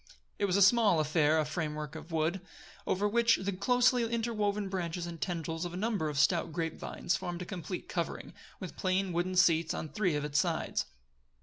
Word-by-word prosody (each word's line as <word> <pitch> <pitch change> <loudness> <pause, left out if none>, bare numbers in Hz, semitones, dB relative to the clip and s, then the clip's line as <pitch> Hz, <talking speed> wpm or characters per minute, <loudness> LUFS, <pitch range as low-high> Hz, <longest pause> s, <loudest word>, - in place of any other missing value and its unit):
It 205 - +2
was 190 -1 +1
a 200 - +6
small 200 -4 +5
affair 155 0 +3
a 155 - +2
framework 150 -2 -4
of 165 +1 -9
wood, 165 +3 0 0.5
over 200 +2 +1
which 230 +2 +4
the 195 +1 -2
closely 245 +5 +3
interwoven 220 -3 -1
branches 175 -2 -3
and 170 -2 -8
tendrils 165 -2 -3
of 175 0 -5
a - - -4
number 205 -6 -1
of 145 - -5
stout 165 +3 +2
grape 165 0 -3
vines 175 - -2
formed 175 -1 -4
a - - -8
complete 180 -2 -6
covering, 170 -2 -4 0.3
with 185 -4 -7
plain 185 0 0
wooden 175 +2 -1
seats 165 -3 +3
on 155 - -4
three 185 -5 0
of 145 0 -1
its 150 0 +1
sides. 165 -1 -1
175 Hz, 195 wpm, -31 LUFS, 160-200 Hz, 0.5 s, a